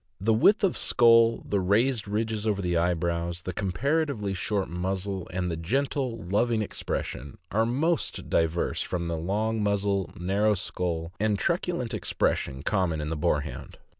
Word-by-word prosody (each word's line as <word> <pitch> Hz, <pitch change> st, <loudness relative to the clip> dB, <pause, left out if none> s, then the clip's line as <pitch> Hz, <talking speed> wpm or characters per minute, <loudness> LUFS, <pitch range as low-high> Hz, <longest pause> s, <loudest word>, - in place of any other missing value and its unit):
The 110 Hz, +4 st, +2 dB
width 200 Hz, -, +4 dB
of 190 Hz, -, +3 dB
skull, 115 Hz, -1 st, +4 dB
the 100 Hz, -, +1 dB
raised 110 Hz, +5 st, +2 dB
ridges 110 Hz, +1 st, -1 dB
over 105 Hz, -2 st, +1 dB
the 90 Hz, -2 st, 0 dB
eyebrows, 85 Hz, 0 st, 0 dB
the 90 Hz, -, -4 dB
comparatively 110 Hz, -, -1 dB
short 95 Hz, +1 st, -1 dB
muzzle, 95 Hz, +2 st, -3 dB
and 90 Hz, -1 st, -2 dB
the -, -, -1 dB
gentle, 130 Hz, -, -1 dB
loving 110 Hz, +4 st, +1 dB
expression, 70 Hz, -8 st, -4 dB
are 110 Hz, +2 st, +2 dB
most 155 Hz, +7 st, -1 dB
diverse 80 Hz, +1 st, 0 dB
from 85 Hz, -1 st, -2 dB
the 85 Hz, -, -1 dB
long 105 Hz, +6 st, -1 dB
muzzle, 100 Hz, -2 st, 0 dB
narrow 100 Hz, +4 st, +2 dB
skull, 85 Hz, -3 st, -3 dB
and 105 Hz, -1 st, +1 dB
truculent 170 Hz, -, -1 dB
expression 70 Hz, -9 st, -1 dB
common 90 Hz, -6 st, 0 dB
in 75 Hz, 0 st, -3 dB
the 80 Hz, -, -2 dB
Boarhound. 75 Hz, -4 st, -2 dB
100 Hz, 150 wpm, -27 LUFS, 85-115 Hz, -, width